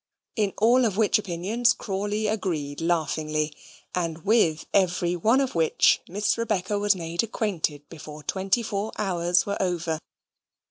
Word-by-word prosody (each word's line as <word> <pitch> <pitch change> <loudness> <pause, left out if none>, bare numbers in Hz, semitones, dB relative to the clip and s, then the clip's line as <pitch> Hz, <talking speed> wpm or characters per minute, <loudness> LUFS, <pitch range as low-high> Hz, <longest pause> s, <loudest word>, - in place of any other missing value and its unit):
in 210 -3 +1
all 240 +4 +4
of 210 -5 0
which 215 -1 +3
opinions 205 +6 +1
Crawley 205 +2 -3
agreed 170 -10 -2
laughingly, 155 -2 -1 0.4
and 165 -1 -3
with 195 -8 +3
every 180 -2 +2
one 220 +9 +3
of 270 -2 0
which 165 -2 +3
Miss 205 +4 0
Rebecca 210 -3 -1
was 205 0 +3
made 170 -1 -2
acquainted 175 -10 -2
before 150 -2 -10
twenty 195 +7 0
four 210 0 -3
hours 175 -3 +1
were 200 0 -2
over. 170 -4 -1
190 Hz, 140 wpm, -25 LUFS, 165-210 Hz, 0.4 s, all